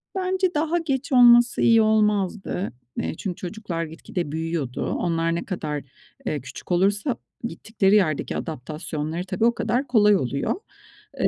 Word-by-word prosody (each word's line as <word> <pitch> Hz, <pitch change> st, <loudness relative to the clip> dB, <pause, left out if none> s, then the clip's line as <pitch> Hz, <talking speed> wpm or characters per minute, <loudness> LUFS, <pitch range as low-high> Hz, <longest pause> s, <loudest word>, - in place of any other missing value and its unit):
Bence 375 Hz, -1 st, 0 dB
daha 320 Hz, +2 st, +1 dB
geç 285 Hz, -3 st, -2 dB
olması 240 Hz, -1 st, +6 dB
iyi 230 Hz, -1 st, +6 dB
olmazdı. 210 Hz, -3 st, +1 dB, 0.3 s
Eee, -, -, -2 dB
çünkü 185 Hz, -4 st, -4 dB
çocuklar 180 Hz, -2 st, -4 dB
gitgide 165 Hz, 0 st, -5 dB
büyüyordu. 160 Hz, -5 st, -2 dB
Onlar 165 Hz, -1 st, 0 dB
ne -, -, -2 dB
kadar, 150 Hz, -7 st, -4 dB, 0.4 s
eee, 150 Hz, -3 st, -2 dB
küçük 130 Hz, +7 st, -10 dB
olursa 205 Hz, +7 st, +1 dB, 0.3 s
gittikleri 210 Hz, -3 st, +1 dB
yerdeki 165 Hz, -8 st, +1 dB
adaptasyonları 155 Hz, +2 st, -4 dB
tabii 190 Hz, +3 st, 0 dB
o 235 Hz, -, +4 dB
kadar 260 Hz, +4 st, 0 dB
kolay 210 Hz, -4 st, +5 dB
oluyor. 140 Hz, -5 st, -1 dB, 0.6 s
Eee, -, -, +3 dB
195 Hz, 140 wpm, -24 LUFS, 165-235 Hz, 0.6 s, olması